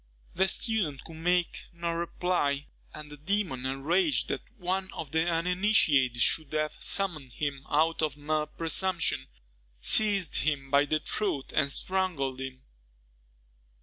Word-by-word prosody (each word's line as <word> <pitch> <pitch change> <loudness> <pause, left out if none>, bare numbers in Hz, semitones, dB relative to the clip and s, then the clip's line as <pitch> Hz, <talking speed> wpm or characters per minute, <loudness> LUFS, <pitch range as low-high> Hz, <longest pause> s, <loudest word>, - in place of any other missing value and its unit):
The 190 +2 +2
student 190 - 0
could 165 - -11
make 175 +1 0
no 170 0 -3
reply; 165 -4 -1 0.3
and 150 -1 -10
the 150 - -9
demon, 155 -6 -1
enraged 165 - +1
that - - -2 0.2
one 190 0 -2
of 145 - -6
the 160 +2 +1
uninitiated 165 - +2
should 155 -3 +1
have 155 0 -1
summoned 165 -10 -1
him 140 -1 -4
out 160 +3 +2
of 150 -2 -1
mere 150 +1 -1
presumption, 165 -2 0 0.5
seized 200 - +4
him 140 -3 -1
by 140 +1 +5
the 155 +1 0
throat 155 -10 -2
and 140 - +2
strangled 145 -6 -1
him. 130 -1 -7
160 Hz, 135 wpm, -29 LUFS, 140-180 Hz, 0.5 s, by